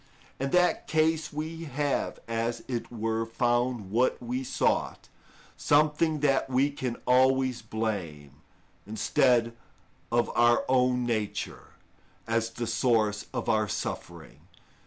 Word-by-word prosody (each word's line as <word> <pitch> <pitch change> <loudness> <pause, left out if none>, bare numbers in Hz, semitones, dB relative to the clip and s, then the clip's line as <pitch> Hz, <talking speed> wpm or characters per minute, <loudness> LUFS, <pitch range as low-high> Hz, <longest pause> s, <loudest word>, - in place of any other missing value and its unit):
In 135 +1 -1
that 180 +3 +2
case 160 0 +1
we 160 +2 -5
have, 145 0 -2
as 115 +1 -2
it 120 -2 -4
were, 115 -1 -1
found 120 -2 -1
what 120 +4 +2
we 125 +2 -3
sought, - - -1 0.5
something 150 +1 +2
that 135 -2 +2
we 135 +3 +2
can 130 -4 -4
always 130 0 +3
blame, 90 -11 -4 0.5
instead 115 +2 +2 0.6
of 120 0 +1
our 120 0 +4
own 125 -1 +2
nature, 110 -3 -3 0.5
as 115 0 0
the 120 +1 -5
source 110 -4 +1
of - - -4
our 110 -1 +2
suffering. 85 -5 -6
120 Hz, 115 wpm, -28 LUFS, 115-135 Hz, 0.6 s, our